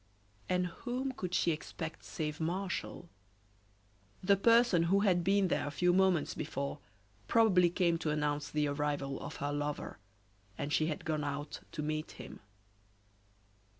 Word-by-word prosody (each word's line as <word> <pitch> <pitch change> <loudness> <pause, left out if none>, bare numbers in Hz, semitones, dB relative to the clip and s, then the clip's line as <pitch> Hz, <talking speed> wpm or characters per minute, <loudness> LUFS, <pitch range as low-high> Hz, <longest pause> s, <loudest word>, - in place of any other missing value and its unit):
And 180 0 +2
whom 250 +9 -3
could 185 -8 -4
she 170 - +3
expect 160 +1 -5
save 150 -1 -4
Martial? 175 +1 -3 1.2
The 200 +2 +5
person 230 -2 +5
who 200 +2 +4
had 180 -4 +3
been 195 +1 +3
there 170 - 0
a - - -1
few 175 +5 +2
moments 185 -4 +3
before 140 +2 -4 0.5
probably 190 -6 +5
came 170 -1 +1
to 160 - -1
announce 150 -1 -1
the 150 -1 +1
arrival 145 -1 -2
of 145 - -6
her 145 +1 -2
lover, 145 -5 -3 0.6
and 145 +1 -3
she 155 - +3
had 155 - -4
gone 155 -2 -1
out 145 +1 -4
to 150 - -3
meet 155 +1 -3
him. - - -10
165 Hz, 150 wpm, -33 LUFS, 150-185 Hz, 1.2 s, The